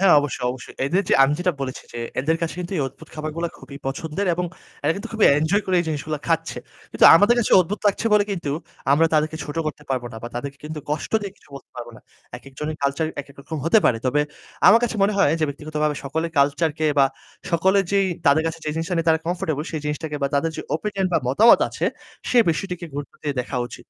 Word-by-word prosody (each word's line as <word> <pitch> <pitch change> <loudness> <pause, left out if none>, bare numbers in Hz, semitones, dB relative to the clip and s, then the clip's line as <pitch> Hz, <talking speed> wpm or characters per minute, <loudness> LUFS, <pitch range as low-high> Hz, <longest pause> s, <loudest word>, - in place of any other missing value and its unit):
হ্যাঁ, 195 -4 +6
অবশ্যই, 130 -3 -3
অবশ্যই, 125 0 -9
এদের 185 +8 +1
যে - - +4
আমি 135 +2 +4
যেটা 180 0 +1
বলেছি 130 -1 -4
যে, 120 - -6 0.2
এদের 160 +4 +1
কাছে 165 - -2
কিন্তু 175 +2 -6
এই 145 - +1
অদ্ভুত 160 +4 -16
খাবারগুলো 155 +2 -3
খুবই 140 - -11
পছন্দের 160 +8 -3
এবং 180 +1 -2 0.4
এরা 155 - +3
কিন্তু 200 - -6
খুবই 220 -1 +2
enjoy 165 +7 +2
করে 185 -1 +2
জিনিসগুলা 155 0 -3
খাচ্ছে। 165 0 0 0.3
কিন্তু - - +2
আমাদের 220 +4 +5
কাছে 235 - +1
অদ্ভুত 200 +4 -3
লাগছে 205 +2 +1
বলে 205 -1 +5
কিন্তু 170 -6 -3 0.4
আমরা 165 +3 +5
তাদেরকে 155 +1 +1
ছোট 145 +2 -7
করতে 150 -1 -5
পারব 130 -2 0
না। - - -8
বা 120 - -5
তাদেরকে 140 +3 -5
কিন্তু 150 0 -5
কষ্ট 150 +7 -3
দিয়ে 200 -2 -6
কিছু - - -25
বলতে - - -14
পারবো 120 -1 -7
না। - - -15 0.4
একেকজনের 150 +3 -6
culture 140 +3 0
একেকরকম 145 +2 -8
হতে 170 +7 +5
পারে। 115 - +3
তবে 150 +4 +2 0.5
আমার 225 +5 +8
কাছে 225 -2 -2
মনে 205 +2 +3
হয় 155 -6 +4
যে - - +3
ব্যক্তিগতভাবে 150 +1 -2
সকলের 160 +4 -2
culture 145 +3 +2
কে 155 - +1
বা 135 - +7 0.5
সকলে 190 +4 +3
যেই 195 -1 +3 0.2
তাদের 140 +3 +5
কাছে 165 0 -3
যে 150 - -1
জিনিসটা 165 +3 -2
নিয়ে 165 0 -1
তারা 160 0 +4
comfortable 170 -4 -2
সেই 155 - -3
জিনিসটাকে 150 0 -3
বা 140 - +2
তাদের 150 +3 +1
যে - - -4
opinion 195 +2 -1
বা - - +4
মতামত 215 - +6
আছে - - -4 0.5
সে 245 - +4
বিষয়টিকে 180 +1 -4
গুরুত্ব 145 0 -6
দিয়ে 145 -2 -2
দেখা 125 +1 -5
উচিত। - - -11
155 Hz, 220 wpm, -22 LUFS, 145-180 Hz, 0.5 s, আমার